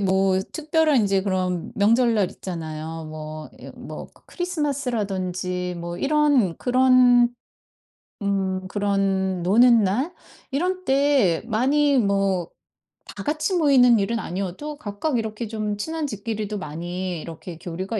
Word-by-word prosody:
뭐 190 Hz, -1 st, +2 dB
특별한 310 Hz, -4 st, +2 dB
인제 195 Hz, -1 st, +2 dB
그런 185 Hz, -3 st, -2 dB
명절날 220 Hz, -1 st, +3 dB
있잖아요. 160 Hz, -2 st, -6 dB
뭐 155 Hz, 0 st, -7 dB
이 -, -, -9 dB
뭐 -, -, -8 dB, 0.2 s
크리스마스라든지 205 Hz, -, -2 dB
뭐 170 Hz, +1 st, -5 dB
이런 280 Hz, -, +2 dB
그런 250 Hz, -1 st, +5 dB, 1.0 s
음 190 Hz, -1 st, -1 dB
그런 195 Hz, -2 st, 0 dB
노는 230 Hz, +4 st, +5 dB
날 255 Hz, -, 0 dB, 0.4 s
이런 365 Hz, +6 st, -1 dB
때 270 Hz, -, +3 dB
많이 275 Hz, +5 st, +2 dB
뭐 195 Hz, -4 st, +1 dB, 0.7 s
다 -, -, -5 dB
같이 310 Hz, +5 st, -1 dB
모이는 250 Hz, -7 st, +5 dB
일은 225 Hz, +4 st, -1 dB
아니어도 195 Hz, -, -5 dB
각각 245 Hz, +3 st, -2 dB
이렇게 220 Hz, 0 st, -3 dB
좀 215 Hz, -1 st, -3 dB
친한 320 Hz, +6 st, -3 dB
집끼리도 210 Hz, -1 st, -4 dB
많이 175 Hz, +3 st, -4 dB
이렇게 165 Hz, 0 st, -9 dB
교류가 185 Hz, +6 st, -4 dB
205 Hz, 250 characters per minute, -23 LUFS, 185-260 Hz, 1.0 s, 그런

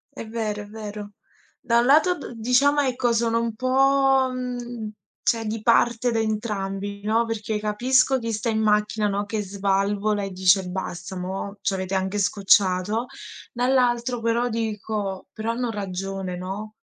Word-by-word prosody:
È 230 Hz, -, -7 dB
vero, 215 Hz, -2 st, -3 dB
è -, -, -12 dB
vero. 210 Hz, -1 st, -8 dB, 0.5 s
Da 235 Hz, -1 st, +3 dB
un 240 Hz, -, +2 dB
lato 315 Hz, +7 st, +4 dB
d -, -, -8 dB
diciamo, 250 Hz, +6 st, +3 dB
ecco, 250 Hz, -3 st, +1 dB
sono 230 Hz, 0 st, +1 dB
un 230 Hz, -1 st, -3 dB
po', 270 Hz, +1 st, +3 dB
mhmm, 245 Hz, -3 st, -5 dB, 0.3 s
cioè, 225 Hz, -1 st, +1 dB
di 215 Hz, 0 st, -3 dB
parte 235 Hz, +1 st, +3 dB
da 225 Hz, -, 0 dB
entrambi, 205 Hz, -2 st, -3 dB
no, 225 Hz, +2 st, +3 dB
perché 220 Hz, -1 st, -3 dB
capisco 255 Hz, +5 st, +2 dB
chi 230 Hz, -1 st, -3 dB
sta 215 Hz, +2 st, -1 dB
in 220 Hz, -1 st, 0 dB
macchina, 210 Hz, 0 st, +2 dB
no, 200 Hz, 0 st, -1 dB
che 210 Hz, +1 st, -2 dB
svalvola 200 Hz, +1 st, 0 dB
e 195 Hz, -, -4 dB
dice: 185 Hz, +1 st, +3 dB
“Basta, 180 Hz, 0 st, -5 dB
mo' 190 Hz, +2 st, -5 dB
ci -, -, 0 dB
avete 190 Hz, 0 st, -3 dB
anche 190 Hz, +2 st, -1 dB
scocciato.” 200 Hz, +1 st, +2 dB, 0.5 s
Dall'altro 245 Hz, -1 st, +1 dB
però 230 Hz, +2 st, +1 dB
dico: 210 Hz, -3 st, -3 dB
“Però 220 Hz, +1 st, -3 dB
hanno 240 Hz, 0 st, -2 dB
ragione,” 195 Hz, -2 st, -4 dB
no? 195 Hz, +4 st, -6 dB
215 Hz, 155 wpm, -24 LUFS, 200-240 Hz, 0.5 s, lato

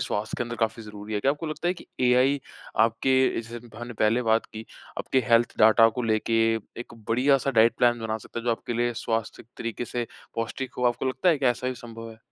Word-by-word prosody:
स्वास्थ्य 105 Hz, +2 st, -2 dB
के -, -, -1 dB
अंदर 120 Hz, 0 st, -5 dB
काफ़ी 115 Hz, 0 st, -1 dB
ज़रूरी 105 Hz, 0 st, -8 dB
है। 105 Hz, -, 0 dB
क्या 135 Hz, -, +3 dB
आपको 150 Hz, +3 st, -4 dB
लगता 155 Hz, +2 st, -2 dB
है 180 Hz, -, +1 dB
कि -, -, -13 dB
एआई 130 Hz, +3 st, +3 dB, 0.4 s
आपके 115 Hz, +4 st, +3 dB, 0.3 s
जैसे 115 Hz, +1 st, -8 dB
हम 120 Hz, 0 st, -12 dB
हमने 120 Hz, +1 st, -6 dB
पहले 110 Hz, +3 st, +2 dB
बात 115 Hz, -1 st, +2 dB
की, 110 Hz, 0 st, -9 dB, 0.3 s
आपके 130 Hz, -, 0 dB
हेल्थ 115 Hz, 0 st, +4 dB
डाटा 110 Hz, +1 st, +7 dB
को 125 Hz, -, -1 dB
लेके 115 Hz, 0 st, +1 dB, 0.4 s
एक 120 Hz, -, -9 dB
बढ़िया-सा 135 Hz, +4 st, +3 dB
डाइट 115 Hz, -2 st, +4 dB
प्लान 120 Hz, -1 st, +3 dB
बना 110 Hz, -1 st, -2 dB
सकता 110 Hz, -, -8 dB
है, 115 Hz, -, -6 dB
जो 120 Hz, -, +2 dB
आपके 115 Hz, +1 st, -3 dB
लिए 120 Hz, +1 st, +1 dB
स्वास्थ्य 115 Hz, -1 st, -2 dB
तरीके 115 Hz, +1 st, -4 dB
से 120 Hz, 0 st, -3 dB, 0.3 s
पौष्टिक 120 Hz, +3 st, -4 dB
हो, 125 Hz, -, 0 dB
आपको 120 Hz, +2 st, -2 dB
लगता 130 Hz, +7 st, 0 dB
है 160 Hz, -4 st, +4 dB
कि 135 Hz, -, +1 dB
ऐसा 125 Hz, +1 st, +1 dB
भी 130 Hz, -, -3 dB
संभव 115 Hz, -1 st, -9 dB
है? 110 Hz, -, -14 dB
120 Hz, 230 wpm, -26 LUFS, 115-125 Hz, 0.4 s, डाटा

